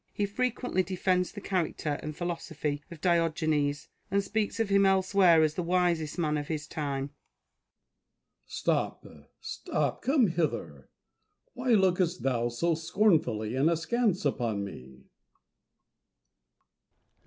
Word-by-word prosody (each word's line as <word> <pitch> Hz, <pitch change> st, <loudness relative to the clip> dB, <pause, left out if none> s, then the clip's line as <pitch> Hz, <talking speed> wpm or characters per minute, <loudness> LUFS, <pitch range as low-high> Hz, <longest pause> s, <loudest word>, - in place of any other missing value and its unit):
He 205 Hz, -, +1 dB
frequently 245 Hz, -1 st, -1 dB
defends 185 Hz, 0 st, 0 dB
the 205 Hz, -, -9 dB
character 165 Hz, -6 st, -2 dB
and 150 Hz, 0 st, -6 dB
philosophy 160 Hz, -4 st, -3 dB
of 170 Hz, -3 st, -11 dB
Diogenes, 155 Hz, -4 st, +1 dB, 0.2 s
and 200 Hz, +1 st, +1 dB
speaks 215 Hz, +2 st, -2 dB
of 225 Hz, -2 st, +1 dB
him 200 Hz, 0 st, +4 dB
elsewhere 190 Hz, -3 st, +4 dB
as 155 Hz, -1 st, +1 dB
the 180 Hz, -, -2 dB
wisest 175 Hz, -3 st, 0 dB
man 155 Hz, -3 st, 0 dB
of 145 Hz, -, -6 dB
his 155 Hz, -1 st, -3 dB
time.] 140 Hz, -3 st, -3 dB
Diogenes. 145 Hz, -, -50 dB
Stop! -, -, -1 dB, 0.3 s
stop! -, -, -2 dB
come 270 Hz, -2 st, +3 dB
hither! 170 Hz, -4 st, -2 dB, 0.6 s
Why 250 Hz, -1 st, 0 dB
lookest 185 Hz, -3 st, +2 dB
thou 120 Hz, -3 st, +1 dB
so 165 Hz, +9 st, 0 dB
scornfully 160 Hz, -, +1 dB
and 140 Hz, +5 st, +3 dB
askance 195 Hz, +4 st, 0 dB
upon 110 Hz, -5 st, 0 dB
me 65 Hz, -8 st, -10 dB
170 Hz, 120 wpm, -29 LUFS, 150-195 Hz, 0.6 s, him